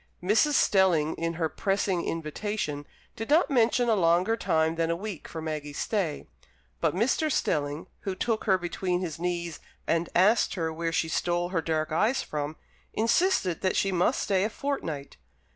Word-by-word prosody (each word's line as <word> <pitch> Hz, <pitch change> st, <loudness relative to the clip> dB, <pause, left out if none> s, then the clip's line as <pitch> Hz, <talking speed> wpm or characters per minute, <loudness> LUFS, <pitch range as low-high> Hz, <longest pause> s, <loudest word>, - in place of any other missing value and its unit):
Mrs. 220 Hz, +11 st, +3 dB
Stelling, 180 Hz, -, +3 dB
in 165 Hz, 0 st, -2 dB
her 165 Hz, -1 st, 0 dB
pressing 195 Hz, 0 st, 0 dB
invitation, 155 Hz, -2 st, -3 dB, 0.3 s
did 225 Hz, +3 st, -6 dB
not 310 Hz, +1 st, +4 dB
mention 240 Hz, -1 st, +3 dB
a 230 Hz, -, +4 dB
longer 180 Hz, +3 st, +3 dB
time 160 Hz, -6 st, +1 dB
than 165 Hz, 0 st, -1 dB
a 170 Hz, -, +1 dB
week 195 Hz, -1 st, -6 dB
for 160 Hz, -1 st, -6 dB
Maggie's 150 Hz, -2 st, -4 dB
stay; 190 Hz, -9 st, -1 dB, 0.5 s
but -, -, +1 dB
Mr. 265 Hz, -, +1 dB
Stelling, 145 Hz, -, -1 dB
who 195 Hz, -2 st, -4 dB
took 220 Hz, +3 st, -1 dB
her 190 Hz, -4 st, +4 dB
between 180 Hz, 0 st, -2 dB
his 165 Hz, -4 st, -4 dB
knees, 170 Hz, -2 st, -3 dB, 0.3 s
and 165 Hz, +1 st, 0 dB
asked 205 Hz, +6 st, +4 dB
her 165 Hz, -3 st, -2 dB
where 165 Hz, +1 st, -2 dB
she 165 Hz, -, 0 dB
stole 175 Hz, +2 st, 0 dB
her 175 Hz, -3 st, 0 dB
dark 155 Hz, -1 st, -1 dB
eyes 215 Hz, +11 st, +2 dB
from, 150 Hz, 0 st, -4 dB, 0.4 s
insisted 230 Hz, -, +2 dB
that 185 Hz, -, +1 dB
she 195 Hz, -, +2 dB
must 180 Hz, -1 st, +2 dB
stay 190 Hz, -1 st, +1 dB
a 210 Hz, -, 0 dB
fortnight. 165 Hz, -, -4 dB
175 Hz, 170 wpm, -27 LUFS, 160-210 Hz, 0.5 s, not